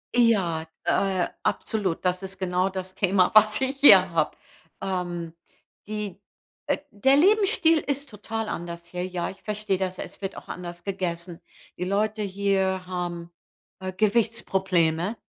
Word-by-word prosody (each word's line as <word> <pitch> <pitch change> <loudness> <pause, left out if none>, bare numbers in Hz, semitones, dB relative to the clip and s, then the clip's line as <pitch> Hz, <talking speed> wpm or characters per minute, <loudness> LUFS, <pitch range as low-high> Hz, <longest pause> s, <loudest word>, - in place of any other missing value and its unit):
Ja, 195 -10 +3 0.2
äh, 190 -2 +1 0.2
absolut. 195 -6 -1
Das 180 0 0
ist 190 0 -7
genau 185 0 0
das 185 -1 -6
Thema, 190 -1 +3
was 215 +1 +6
ich 265 +1 -1
hier 190 -10 +8
habe. 160 -2 0 0.5
Ähm, 175 -3 -3 0.5
die, 210 -2 -5 0.5
äh - - +2
der 265 +7 +3
Lebensstil 370 -1 +4
ist 280 -1 -3
total 220 +1 -5
anders 170 0 -6
hier, 180 +1 -4
ja, 180 -2 -3
ich 195 - -12
verstehe 210 -2 -1
das, 185 -1 -3
es - - -8
wird 195 -1 -4
auch - - -11
anders 175 -1 -7
gegessen. 175 -3 -4 0.4
Die 180 - -2
Leute 210 +3 0
hier 190 -1 0
haben, 175 -2 -5 0.5
äh, 185 0 -5
Gewichtsprobleme 190 -4 +1
190 Hz, 140 wpm, -25 LUFS, 180-215 Hz, 0.5 s, hier